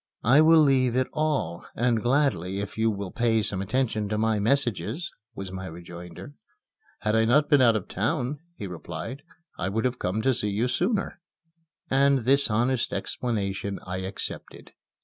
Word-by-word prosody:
"I 135 +7 +6
will 160 0 +7
leave 130 -4 +3
it 130 0 +2
all, 150 - -1
and 120 -1 +1
gladly, 105 - +1
if 100 -1 -5
you 110 0 +2
will 100 -3 -4
pay 115 -2 +1
some 100 -2 -2
attention 110 -1 -1
to 105 - -1
my 110 0 +1
messages," 135 - 0 0.2
was 95 -3 -6
my 95 0 -6
rejoinder. 85 - -10 0.7
"Had 110 +1 +1
I 110 - +4
not 140 +7 +4
been 145 -2 +6
out 115 -3 +5
of 105 - -2
town," 130 - -1 0.2
he 105 - -5
replied, 90 - -6 0.4
"I 90 - -1
would 110 +5 -1
have 125 0 -1
come 100 +5 -1
to 130 - +3
see 105 -3 -2
you 105 +5 0
sooner." 185 - -1 0.7
And 135 0 +3
this 135 +3 +3
honest 120 +3 +1
explanation 100 -4 -2
I 90 0 -4
accepted. 95 +1 -6
115 Hz, 170 wpm, -26 LUFS, 100-130 Hz, 0.7 s, will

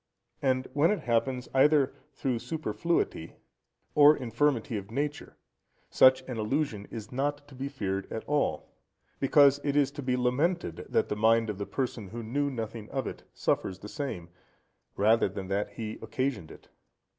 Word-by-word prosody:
And 130 -1 +1
when 150 +4 +4
it 210 - 0
happens 125 +2 0
either 140 0 +4 0.2
through 130 -3 -2
superfluity 160 - -2 0.6
or 150 +1 +7
infirmity 125 0 0
of 100 -1 -5
nature, 145 +5 -4 0.5
such 130 0 +6
an 125 -3 -5
illusion 110 -2 -1
is 110 -2 -8
not 145 +2 -2
to - - -14
be 135 +2 -4
feared 100 -8 -3
at 110 - -4
all, 145 - -1 0.5
because 140 0 +5
it 140 -1 0
is 145 -2 +3
to 145 - -7
be 125 -1 0
lamented, 125 - 0
that - - +1
the - - -1
mind 110 +1 +3
of 100 - -9
the 100 - -3
person, 125 -6 -3
who 115 +4 -7
knew 140 +6 -1
nothing 115 -3 -5
of 135 -3 -2
it, - - -6
suffers 95 - 0
the 100 - -10
same, 130 - -5 0.7
rather 110 +1 +4
than 95 0 -6
that 100 +1 -1
he 110 -1 -6
occasioned 130 - -2
it. - - -14
125 Hz, 165 wpm, -29 LUFS, 110-145 Hz, 0.7 s, or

